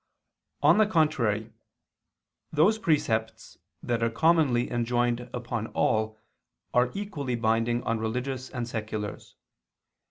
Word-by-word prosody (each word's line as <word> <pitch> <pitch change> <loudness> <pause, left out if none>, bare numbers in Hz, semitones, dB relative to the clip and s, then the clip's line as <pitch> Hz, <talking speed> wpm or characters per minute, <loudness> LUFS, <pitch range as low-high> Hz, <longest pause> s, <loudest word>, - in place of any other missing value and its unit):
On - - +6
the 215 - +5
contrary, 120 - +1 1.0
Those 175 +9 +3
precepts 110 - -1 0.2
that 120 -1 -1
are 115 - +2
commonly 140 -2 +2
enjoined 120 0 0
upon 120 -2 -4
all 110 0 +1 0.6
are 125 +1 +3
equally 155 -11 -3
binding 115 +1 +1
on 115 0 -1
religious 125 +3 -3
and 120 -4 -4
seculars. 110 -2 -5
120 Hz, 105 wpm, -27 LUFS, 110-140 Hz, 1.0 s, On